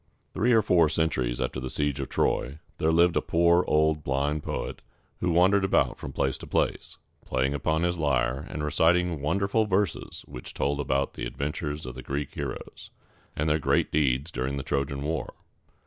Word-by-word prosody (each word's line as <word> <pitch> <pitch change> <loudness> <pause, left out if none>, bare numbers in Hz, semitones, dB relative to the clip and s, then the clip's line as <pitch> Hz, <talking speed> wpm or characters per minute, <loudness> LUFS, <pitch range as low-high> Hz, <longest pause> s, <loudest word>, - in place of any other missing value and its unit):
Three 120 +3 +2
or 110 -2 +5
four 85 -5 +4
centuries 65 -7 0
after 65 0 -2
the 65 0 -5
siege 75 0 -1
of 70 - -4
Troy, 70 +4 0 0.2
there 80 - +2
lived 85 +1 +4
a - - +3
poor 85 +1 +3
old 75 0 +2
blind 70 +3 0
poet - - -4 0.4
who 90 - 0
wandered 95 +4 +4
about 95 - +2
from - - -6
place 65 -1 -1
to - - -9
place, - - -1 0.3
playing 65 +2 0
upon 80 +3 0
his 85 -1 0
lyre, 65 -1 0
and 75 - -4
reciting 85 +1 +2
wonderful 100 +8 +1
verses 95 -3 -1
which 60 - -9
told 70 +1 0
about 70 -1 0
the - - -4
adventures 75 +2 -4
of 65 - -6
the 65 - -8
Greek 70 +1 -4
heroes, - - -6 0.5
and 75 - -1
their 75 0 +2
great - - +1
deeds 70 +1 +1
during 65 +2 -2
the 70 - -3
Trojan 70 0 -2
War. 80 +2 -3
75 Hz, 180 wpm, -27 LUFS, 70-85 Hz, 0.5 s, or